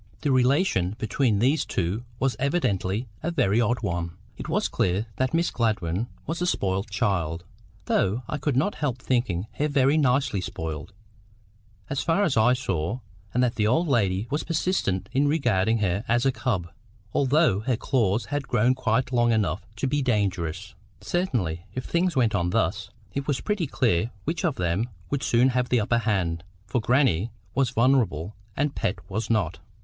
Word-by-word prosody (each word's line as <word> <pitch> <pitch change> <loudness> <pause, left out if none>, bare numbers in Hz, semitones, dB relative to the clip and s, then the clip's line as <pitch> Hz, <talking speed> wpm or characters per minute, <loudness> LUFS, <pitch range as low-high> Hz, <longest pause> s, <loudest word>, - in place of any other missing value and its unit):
The 145 - +1
relation 130 - +2
between 115 -1 +1
these 135 +8 +2
two 95 +7 -2
was 135 +1 0
evidently 120 - 0
a 165 - -1
very 115 - +2
odd 115 +1 0
one. 85 -2 -2 0.2
It - - -7
was - - +1
clear 95 +4 0
that 130 0 +1
Miss 170 +1 +1
Gladwyn 105 -3 0 0.2
was 170 - -3
a 180 - +1
spoiled 95 - 0
child, 90 -5 -1 0.4
though 110 +7 +1
I 150 - -3
could 145 -1 0
not 165 +10 +2
help 140 -5 -2
thinking 120 -8 0
her 150 - +2
very 140 0 +3
nicely 130 -6 +2
spoiled, 80 -1 -5 1.0
as 140 - -2
far 170 +5 +2
as 160 -10 +1
I 115 +2 +5
saw; 120 -3 -2 0.3
and 125 - +2
that 120 -2 0
the 105 -1 +2
old 165 +10 +2
lady 100 -8 +2
persisted 145 - -1
in 140 +2 +3
regarding 115 -8 +2
her 95 +3 0
as 120 +2 +2
a 135 - +4
cub, 110 -8 -2 0.4
although 140 - +3
her 120 +2 0
claws 115 -4 +1
had 145 -1 -1
grown 125 0 +3
quite 130 0 0
long 120 -1 +3
enough 105 -4 0
to 115 - -2
be 145 +2 +1
dangerous. 100 - -1 0.3
Certainly, 100 - -1
if 130 - -3
things 175 +1 +1
went 120 -4 +3
on 85 0 +1
thus, - - 0 0.2
it 140 0 -3
was 145 -3 0
pretty 205 -7 -1
clear 115 -6 +1
which 160 +1 -2
of 160 -6 +1
them 90 +7 -1 0.2
would 140 -2 0
soon 120 +2 +3
have 125 -1 0
the 125 - +3
upper 120 +3 +1
hand, 90 -7 0 0.2
for 120 +4 -1
grannie 120 - +2 0.2
was 135 -3 +2
vulnerable, 115 - +1 0.2
and 145 0 +1
Pet 90 - -1
was 105 +5 -3
not. 100 -8 0
120 Hz, 175 wpm, -25 LUFS, 95-135 Hz, 1.0 s, I